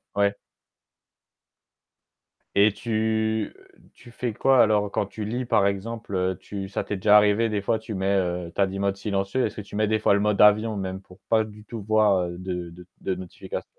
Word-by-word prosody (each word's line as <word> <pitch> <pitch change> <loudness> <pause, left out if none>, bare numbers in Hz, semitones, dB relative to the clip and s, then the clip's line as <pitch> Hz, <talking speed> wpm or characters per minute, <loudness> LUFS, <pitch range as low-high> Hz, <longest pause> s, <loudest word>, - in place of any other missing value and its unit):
Ouais. 100 0 +2 2.2
Et 100 +1 +5
tu 110 0 -1 0.4
tu 120 - -15
fais 120 0 -3
quoi 135 -2 +4
alors 105 -2 +2
quand 100 - -1
tu 105 +1 -6
lis, 120 +4 -2
par 105 -3 +3
exemple, 100 -3 -2
tu 95 -1 -6
ça - - -2
t'est 105 - -4
déjà 105 +2 +6
arrivé, 105 +2 +3
des 105 -1 -1
fois, 110 - +1
tu 110 -1 -7
mets, 95 +1 +1
heu, 90 -2 -1
tu - - 0
as 95 - +4
dit: 95 +1 -5
«Mode 100 0 0
silencieux», 100 +4 -1
est-ce 105 - -4
que - - -5
tu 105 - -11
mets 110 0 +1
des 110 - +2
fois 105 - +3
le 100 - +3
mode 105 -1 +1
avion 105 +1 +5
même 95 0 -4
pour 90 0 -18
pas 110 -1 +4
du 105 0 -12
tout 115 -2 -7
voir 100 -4 +2
de 90 -1 -5
de 90 +1 -13 0.2
de 95 - -1
notifications? 90 -1 -7
105 Hz, 200 wpm, -25 LUFS, 95-110 Hz, 2.2 s, déjà